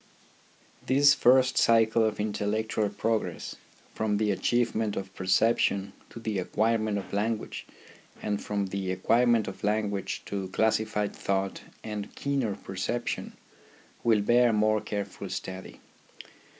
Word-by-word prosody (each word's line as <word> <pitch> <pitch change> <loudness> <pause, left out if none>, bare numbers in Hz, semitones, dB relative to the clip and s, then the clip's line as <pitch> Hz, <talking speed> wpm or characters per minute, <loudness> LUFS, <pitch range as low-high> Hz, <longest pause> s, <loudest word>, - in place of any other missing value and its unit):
This 140 +2 +6
first 130 0 +4
cycle 115 0 +4
of 110 -1 0
intellectual 105 0 -1
progress 110 +2 -2 0.4
from 105 -1 0
the 105 0 +1
achievement 110 0 0
of 95 0 -5
perception 100 +1 +1 0.2
to - - -10
the 110 -3 -2
acquirement 110 +2 0
of 100 - -7
language, 110 +2 -2 0.5
and 105 -1 -2
from 100 -1 -1
the 95 -1 -3
acquirement 115 +4 +3
of - - -8
lan 105 0 +1
guage 95 -1 -4
to 100 -2 -4
classified 110 +1 0
thought 95 0 -2 0.2
and 105 -2 -6
keener 135 -8 -1
percep 95 +6 -4
tion, - - -4 0.7
will 110 -3 +4
bear 120 +3 +4
more 110 0 +2
careful 100 -2 -5
study. 95 0 -6
105 Hz, 125 wpm, -28 LUFS, 100-115 Hz, 0.7 s, This